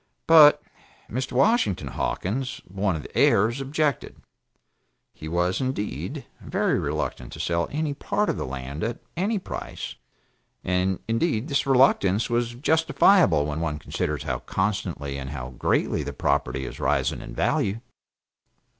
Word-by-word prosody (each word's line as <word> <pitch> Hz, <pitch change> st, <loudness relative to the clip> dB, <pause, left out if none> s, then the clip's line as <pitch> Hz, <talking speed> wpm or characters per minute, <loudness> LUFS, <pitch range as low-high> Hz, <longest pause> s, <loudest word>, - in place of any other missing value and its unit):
But 155 Hz, -2 st, +8 dB, 0.5 s
Mr. 130 Hz, +4 st, -3 dB
Washington 125 Hz, -, +2 dB
Hawkins 125 Hz, -, -2 dB
(one 95 Hz, 0 st, -1 dB
of 75 Hz, -, -5 dB
the -, -, -13 dB
heirs) 115 Hz, +7 st, +3 dB
objected. 145 Hz, 0 st, -1 dB, 1.0 s
He 80 Hz, -, -9 dB
was, 90 Hz, +5 st, 0 dB
indeed, 130 Hz, -6 st, -3 dB, 0.2 s
very -, -, 0 dB
reluctant -, -, -3 dB
to -, -, -9 dB
sell 85 Hz, 0 st, 0 dB
any 150 Hz, 0 st, -1 dB
part 205 Hz, +8 st, -1 dB
of -, -, 0 dB
the -, -, -3 dB
land 65 Hz, +4 st, -5 dB
at 115 Hz, +1 st, -2 dB, 0.2 s
any 205 Hz, +6 st, 0 dB
price; 190 Hz, -, -6 dB, 0.7 s
and 90 Hz, 0 st, +1 dB
indeed 115 Hz, +2 st, 0 dB
this 140 Hz, -1 st, 0 dB
reluctance 120 Hz, -6 st, +3 dB
was 120 Hz, 0 st, 0 dB
justifiable 160 Hz, -, +4 dB
when 75 Hz, +1 st, -3 dB
one 75 Hz, -2 st, -2 dB
considers 75 Hz, -, -3 dB
how 60 Hz, -2 st, -2 dB
constantly 75 Hz, -3 st, -2 dB
and 65 Hz, -1 st, -6 dB
how 65 Hz, -3 st, -6 dB
greatly 60 Hz, -, 0 dB
the -, -, -5 dB
property 70 Hz, -2 st, 0 dB
is -, -, -8 dB
rising -, -, 0 dB
in -, -, -9 dB
value. 100 Hz, +3 st, 0 dB
105 Hz, 140 wpm, -25 LUFS, -, 1.0 s, But